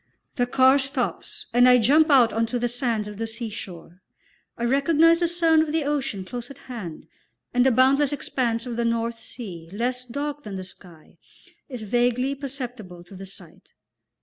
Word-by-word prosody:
The 245 -2 0
car 260 +2 +5
stops 270 -2 -2
and 245 +1 +6
I 250 - +7
jump 295 +8 +4
out 255 -5 +5
on 225 +1 +1
to 245 - -2
the 245 0 0
sands 235 -3 -2
of 210 0 -9
the 225 - -2
seashore; 200 -6 -8 0.6
I 235 - -4
recognise 310 +6 +4
the 345 - +2
sound 330 -2 +3
of 315 -1 -1
the 320 0 0
ocean 275 -9 -2
close 245 +4 -7
at 275 - -11
hand, 220 -11 -8 0.5
and 245 0 +4
the 265 - +5
boundless 265 +4 +4
expanse 245 -4 -2
of 240 -2 -5
the 235 - 0
North 230 0 -1
Sea, 180 -11 -8
less 245 +5 -2
dark 285 +4 -4
than 210 -8 -7
the 190 - -5
sky, 175 -3 -12 0.5
is 250 -5 -6
vaguely 245 +4 +1
perceptible 245 -10 -6
to 175 +3 -14
the 195 +1 -9
sight. 185 -3 -11
245 Hz, 180 wpm, -24 LUFS, 220-275 Hz, 0.6 s, I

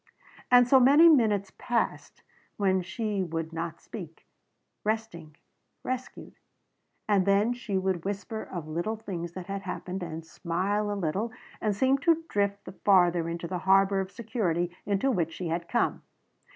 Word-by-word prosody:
And 245 -1 +7
so 265 +1 +6
many 285 +6 +7
minutes 215 - +4
passed 240 -1 -2 0.3
when 190 -2 +2
she 200 +3 -2
would 165 -2 -3
not 165 0 -4
speak 170 -7 -10 0.6
resting, 210 -9 -3 0.5
rescued. 255 0 -6 0.7
And 200 -3 +2
then 205 +4 +3
she 235 -5 -3
would 185 -3 -1
whisper 205 +3 -4
of 170 -4 -7
little 170 +8 -2
things 175 -6 -6
that 185 -1 -7
had 195 +1 -4
happened 185 0 -5
and 165 -2 -6
smile 195 +6 -1
a 205 - -2
little 195 +7 -1 0.3
and 210 -2 0
seem 265 +5 +3
to 330 +2 +2
drift 200 0 -1
the - - -7
farther 175 -4 +3
into 170 0 -4
the 180 +1 -3
harbor 195 +1 +4
of 190 -1 -2
security 180 -7 -2
into 205 +7 +1
which 165 -7 -1
she 175 -3 -4
had 170 +1 -2
come. 240 - +1
195 Hz, 155 wpm, -28 LUFS, 175-220 Hz, 0.7 s, And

